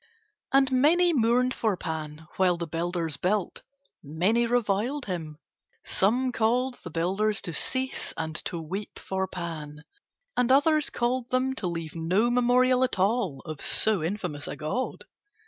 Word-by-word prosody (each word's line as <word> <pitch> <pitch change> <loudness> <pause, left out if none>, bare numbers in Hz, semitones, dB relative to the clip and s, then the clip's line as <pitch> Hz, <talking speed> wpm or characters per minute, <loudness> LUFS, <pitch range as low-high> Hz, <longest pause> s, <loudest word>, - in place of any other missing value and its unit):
And 270 0 +4
many 335 +7 +4
mourned 250 0 +2
for 215 -5 0
Pan 155 -2 -5
while 180 -2 +3
the 170 - -3
builders 165 -1 -1
built; 195 +1 -1 0.4
many 190 +11 +1
reviled 240 +4 0
him. 160 -5 -5 0.5
Some 250 +6 +2
called 245 +3 0
the - - -6
builders 195 +5 0
to 170 - -3
cease 260 +9 0
and 160 -1 -4
to 170 - -3
weep 190 +6 -6
for 190 0 -3
Pan 155 -5 -6 0.5
and 250 0 +2
others 300 +2 +4
called 245 +1 -1
them 255 +1 +1
to 210 -8 -4
leave 165 -3 -4
no 185 +9 +1
memorial 250 +1 +3
at 255 - 0
all 190 - 0
of 155 -3 -7
so 215 -5 +2
infamous 170 -5 -3
a - - -4
god. 200 +12 -3
205 Hz, 145 wpm, -27 LUFS, 165-250 Hz, 0.5 s, And